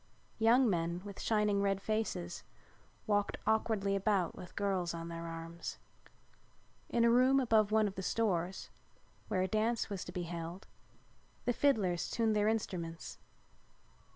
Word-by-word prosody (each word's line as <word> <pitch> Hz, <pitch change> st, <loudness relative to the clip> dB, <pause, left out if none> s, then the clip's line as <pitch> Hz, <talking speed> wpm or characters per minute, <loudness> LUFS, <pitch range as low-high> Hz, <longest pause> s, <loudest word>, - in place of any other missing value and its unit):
Young 235 Hz, +3 st, +5 dB
men 170 Hz, -2 st, -1 dB
with 200 Hz, -1 st, -7 dB
shining 210 Hz, -2 st, +2 dB
red 195 Hz, -1 st, +1 dB
faces 195 Hz, -5 st, -2 dB, 0.6 s
walked 205 Hz, -2 st, +1 dB
awkwardly 215 Hz, -3 st, +1 dB
about 195 Hz, -3 st, +1 dB
with 180 Hz, -, -10 dB
girls 190 Hz, -4 st, 0 dB
on 165 Hz, 0 st, -6 dB
their 170 Hz, 0 st, -5 dB
arms. 165 Hz, +1 st, -6 dB, 1.1 s
In 235 Hz, -1 st, +3 dB
a 235 Hz, -, +5 dB
room 255 Hz, +3 st, +5 dB
above 220 Hz, -5 st, +3 dB
one 215 Hz, -1 st, +4 dB
of 195 Hz, -, -4 dB
the 190 Hz, -, -5 dB
stores, 190 Hz, -3 st, -1 dB, 0.6 s
where 185 Hz, -2 st, +1 dB
a -, -, 0 dB
dance 220 Hz, +2 st, 0 dB
was 195 Hz, -2 st, -3 dB
to -, -, -7 dB
be 180 Hz, -1 st, -3 dB
held, 170 Hz, +2 st, -6 dB, 0.8 s
the 245 Hz, -, +2 dB
fiddlers 205 Hz, -11 st, +2 dB
tuned 225 Hz, -2 st, +1 dB
their 210 Hz, 0 st, +3 dB
instruments. 175 Hz, -7 st, -3 dB
200 Hz, 145 wpm, -34 LUFS, 175-220 Hz, 1.1 s, Young